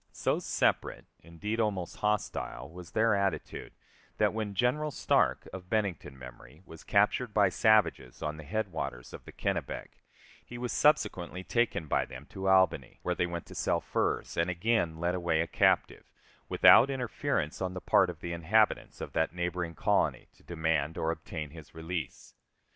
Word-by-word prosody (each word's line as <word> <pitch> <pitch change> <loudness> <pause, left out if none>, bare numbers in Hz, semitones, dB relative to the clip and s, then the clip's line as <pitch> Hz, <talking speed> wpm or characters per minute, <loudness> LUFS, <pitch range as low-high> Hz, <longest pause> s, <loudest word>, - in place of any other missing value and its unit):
So - - 0
separate, - - 0
indeed 95 +8 -5
almost 100 -6 -1
hostile, 80 -10 -2
was 90 -1 -10
their 110 +7 +2
attitude, 100 -3 -2 0.4
that - - +2
when 105 -2 -3
General 140 +8 +1
Stark, 145 - +1
of 90 -1 -9
Bennington 95 -10 -2
memory, 65 +6 -13
was 80 -1 -12
captured 105 +2 +1
by 100 -2 +5
savages 105 - +2
on 75 0 -3
the 80 - -9
head 105 +6 -3
waters 65 -6 -5
of - - -9
the - - -10
Kennebec, - - -4 0.4
he 120 - -9
was 120 0 -3
subsequently 95 - +1
taken 115 -7 0
by 75 - +1
them 65 +2 -10
to 95 0 -2
Albany, 95 -1 +3
where 90 - 0
they 90 - 0
went 85 -1 -5
to - - -12
sell - - 0
furs, - - -2
and 85 +2 +1
again 90 -2 0
led 85 +1 0
away 85 -3 0
a 85 - +2
captive, - - +1 0.4
without 125 +5 +7
interference 125 - -2
on 95 0 -2
the - - -3
part 95 0 +3
of 85 -1 -8
the 85 -1 -4
inhabitants 100 +6 +1
of - - -6
that 80 +2 0
neighboring 90 -1 -3
colony - - 0
to - - -25
demand 80 -2 -1
or 80 - 0
obtain 80 -2 -6
his 80 -2 -13
release. 80 -2 -5
90 Hz, 170 wpm, -30 LUFS, 80-105 Hz, 0.4 s, without